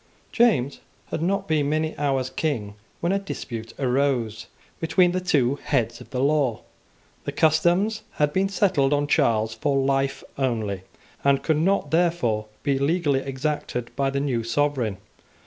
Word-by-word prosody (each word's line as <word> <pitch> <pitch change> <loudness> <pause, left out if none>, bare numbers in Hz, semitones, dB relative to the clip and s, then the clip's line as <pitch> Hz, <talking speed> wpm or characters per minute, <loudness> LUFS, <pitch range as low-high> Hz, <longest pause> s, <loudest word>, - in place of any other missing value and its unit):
James 145 - +2 0.3
had - - -2
not 195 +3 0
been 150 -3 +1
many 155 +1 0
hours 135 -3 0
King 115 -10 -2 0.3
when 170 - +1
a 195 - +2
dispute 115 - -6
arose 125 -4 0 0.3
between 175 +2 +3
the 185 +1 -1
two 145 -7 +2
heads 120 -5 0
of - - -13
the 125 - -3
law. 140 -5 +2 0.6
The - - -2
customs 175 +7 +2
had 150 -1 +1
been 195 +1 +2
settled 180 -8 +2
on 145 0 +2
Charles 110 -5 +2
for 140 +2 0
life 135 0 0 0.2
only, 110 -8 -1 0.4
and 140 -1 +3
could 160 -2 +2
not 175 -3 +1
therefore 160 -11 +1 0.2
be 140 -1 +1
legally 145 -1 +2
exacted 135 -3 -3
by 135 0 +1
the 140 0 -1
new 130 -5 -1
sovereign. 125 -4 0
140 Hz, 150 wpm, -24 LUFS, 125-160 Hz, 0.6 s, between